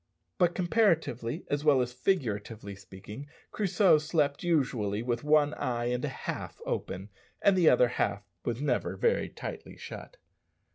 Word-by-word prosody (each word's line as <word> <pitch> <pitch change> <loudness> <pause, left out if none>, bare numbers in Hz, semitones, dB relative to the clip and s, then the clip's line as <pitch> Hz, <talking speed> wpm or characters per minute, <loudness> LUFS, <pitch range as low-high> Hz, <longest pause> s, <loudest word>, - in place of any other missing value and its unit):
But, 175 -1 +3
comparatively 170 - +1
as 145 0 -1
well 145 -3 +5
as 125 -1 -1
figuratively 110 - -2
speaking, 100 +7 -10 0.2
Crusoe 195 -5 +4
slept 150 -2 0
usually 125 - 0
with 120 +1 -2
one 150 0 +4
eye 120 -3 -1
and 125 - -2
a - - 0
half - - -6
open, 95 +3 -4 0.3
and 200 - +4
the 175 -4 +6
other 125 0 +5
half 105 -4 -1 0.2
was 120 +3 -2
never 150 - 0
very 470 - +1
tightly 440 -2 -8
shut. - - -9
140 Hz, 145 wpm, -29 LUFS, 115-170 Hz, 0.3 s, the